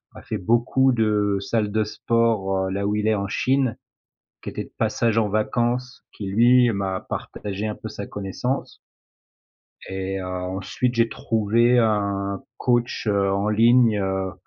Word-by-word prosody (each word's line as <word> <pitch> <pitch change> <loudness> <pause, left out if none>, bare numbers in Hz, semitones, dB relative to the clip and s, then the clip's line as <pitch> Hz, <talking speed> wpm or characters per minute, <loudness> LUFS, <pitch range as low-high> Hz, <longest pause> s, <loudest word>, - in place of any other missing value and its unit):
a - - -10
fait 110 - -3
beaucoup 120 +6 +2
de 105 -4 +1
salles 105 +1 -1
de 110 +1 +1
sport, 105 -4 0
heu, - - -4
là 100 +1 -2
où 105 - 0
il 105 0 0
est 110 - +4
en 100 -1 -2
Chine, 130 +3 0 0.7
qui - - -5
était - - -5
de - - -17
passage 115 -1 +1
en 110 -2 +2
vacances, 120 +4 -1
qui 100 - -7
lui, 120 +5 +5
m'a 95 -2 -2
partagé 105 +1 -5
un 105 - -3
peu 110 - -8
sa 100 -1 -7
connaissance. 105 +7 -4 1.1
Et 95 0 -3
heu, - - -5
ensuite 95 +6 -3
j'ai 115 0 +3
trouvé 115 +3 +2
un 100 -3 0 0.2
coach, 120 -1 0
heu, 100 -1 +2
en 100 +2 0
ligne, 115 +1 +4
heu, 95 -1 -2
105 Hz, 160 wpm, -23 LUFS, 100-115 Hz, 1.1 s, lui